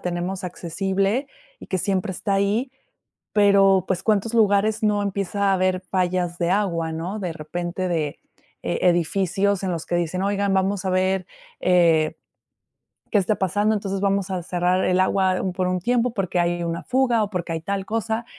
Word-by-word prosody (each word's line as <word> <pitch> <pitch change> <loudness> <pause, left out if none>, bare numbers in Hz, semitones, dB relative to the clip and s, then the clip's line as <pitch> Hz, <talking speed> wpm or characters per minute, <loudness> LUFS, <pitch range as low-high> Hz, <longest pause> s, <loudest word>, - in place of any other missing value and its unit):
tenemos 180 +2 -3
accesible 195 - -1 0.3
y - - -11
que 185 - -1
siempre 190 +1 -1
está 195 +2 -2
ahí. 210 +6 +1 0.6
Pero 195 -2 +5
pues, 190 -1 -1
¿cuántos 215 +2 +1
lugares 215 0 +3
no 210 -1 +2
empieza 200 0 -1
a - - +4
haber 185 0 +1
fallas 180 -2 -1
de 175 0 0
agua?, 170 -5 0
¿no?, 180 +6 -4
de 180 -4 -3
repente 175 +3 -4
de, 155 -4 -2 0.4
eh, - - -1
edificios 190 +3 +1
en 185 - -1
los 165 -2 -4
que 175 - -2
dicen: 175 +2 -1
"Oigan, 200 -1 0
vamos 190 0 0
a - - +1
ver, 185 0 +1 0.3
eh, 165 -4 +3 1.0
que 215 - +3
esté 205 +2 +2
pasando. 205 +4 +1
Entonces 195 -2 -2
vamos 200 -1 +1
a 180 -2 -3
cerrar 180 +1 +1
el 185 0 +2
agua 185 -1 +2
por 185 -1 0
un 180 0 0
tiempo 240 +4 +1
porque 190 -5 -1
hay 175 0 0
una 170 0 -3
fuga 250 -4 +2
o 205 - -3
porque 175 -2 -3
hay 165 - -3
tal 195 +2 -3
cosa". 225 +1 -2
190 Hz, 175 wpm, -23 LUFS, 175-200 Hz, 1.0 s, Pero